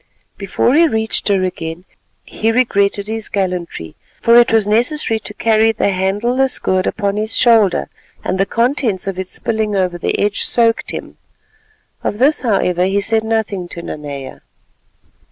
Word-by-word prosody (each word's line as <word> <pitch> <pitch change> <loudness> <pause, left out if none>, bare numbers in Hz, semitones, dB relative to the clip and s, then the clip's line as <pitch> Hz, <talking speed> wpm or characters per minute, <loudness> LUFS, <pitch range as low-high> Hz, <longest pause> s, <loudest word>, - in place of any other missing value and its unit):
Before 200 +5 0
he 330 +3 +5
reached 220 -5 -1
her 195 -2 +2
again, 170 -1 -5 0.4
he 225 +1 -1
regretted 200 -4 +1
his 220 0 -4
gallantry, 180 - -4 0.2
for 235 - +4
it 240 - +4
was 220 -2 +2
necessary 230 +2 0
to 210 - -9
carry 225 0 +3
the 220 -2 0
handleless 225 +8 0
gourd 185 0 0
upon 200 -2 -2
his 215 +1 0
shoulder, 220 -7 +3 0.4
and 190 - -2
the 195 - +2
contents 230 -4 0
of 195 -1 -4
it 190 - -4
spilling 220 0 -2
over 180 -2 -1
the - - -1
edge 205 0 0
soaked 230 -1 +3
him. - - -7 0.9
Of 205 - -2
this, 280 +6 +3
however, 180 -6 +1
he 195 +2 +1
said 220 +2 0
nothing 220 -5 -2
to 170 0 -8
Nanea. 140 -4 -7
210 Hz, 155 wpm, -16 LUFS, 185-225 Hz, 0.9 s, he